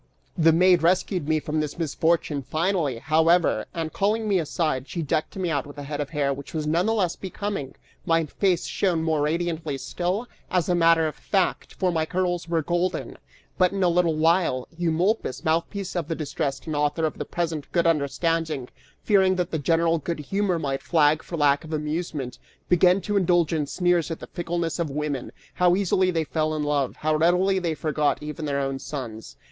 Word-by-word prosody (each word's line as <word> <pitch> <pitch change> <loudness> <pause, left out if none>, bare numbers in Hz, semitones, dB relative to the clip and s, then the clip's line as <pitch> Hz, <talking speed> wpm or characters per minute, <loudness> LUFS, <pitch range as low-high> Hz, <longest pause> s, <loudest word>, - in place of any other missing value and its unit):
The 165 0 +5
maid 180 +1 +5
rescued 180 -1 +1
me 155 0 +3
from 155 0 -2
this 150 -1 -3
misfortune 160 -2 0
finally, 155 -2 0
however, 160 +6 +2
and 165 -3 -4
calling 215 +2 0
me 195 -3 +3
aside, 155 -4 -1
she 170 - -3
decked 155 +1 -1
me 185 -3 -1
out 145 -3 -1
with 145 - -12
a 145 - -6
head 145 +1 -4
of 145 - -4
hair 145 -3 0
which 140 +3 -9
was 155 -1 -1
none 170 +6 +1
the 225 - +2
less 185 -6 +1
becoming; 195 -7 -5 0.3
my 165 -1 +2
face 180 +3 0
shone 175 -5 0
more 160 -2 +1
radiantly 160 -1 -1
still, 180 - -2 0.2
as 180 -3 +1
a 180 - +2
matter 165 -1 +4
of 155 - -4
fact, 190 -3 -1
for 185 -2 +1
my 160 -2 0
curls 175 -1 -1
were 165 -2 +1
golden! 175 +3 -1 0.4
But 185 0 +4
in 195 -1 0
a 180 - +4
little 170 -2 +2
while, 160 -5 +2
Eumolpus, 175 - 0
mouthpiece 175 +4 -1
of 170 -4 -2
the 165 - -2
distressed 140 -3 -3
and 155 - -3
author 150 +2 +1
of 155 - -3
the - - -1
present 165 -4 -3
good 170 -1 +2
understanding, 160 -2 0 0.3
fearing 190 -3 +4
that 180 -1 -2
the 160 - -1
general 165 +2 +2
good 170 +3 -3
humor 195 +4 0
might 135 -4 -2
flag 155 -2 +3
for 170 - -6
lack 145 -1 +3
of 160 0 -8
amusement, 150 -4 -3 0.3
began 180 +2 +4
to 205 +1 -1
indulge 175 -4 +2
in 150 -3 0
sneers 175 0 +1
at 165 - -4
the - - -8
fickleness 170 -1 -3
of 165 -3 -1
women: 145 -2 -3 0.2
how 180 -1 +3
easily 190 -1 +2
they 165 -3 0
fell 155 0 -1
in 150 - -1
love; 145 -3 0
how 155 0 0
readily 180 +4 +3
they 170 -3 -1
forgot 150 -1 0
even 150 +1 -5
their 140 -1 -1
own 135 -1 -2
sons! 110 - -7
165 Hz, 195 wpm, -25 LUFS, 150-180 Hz, 0.4 s, The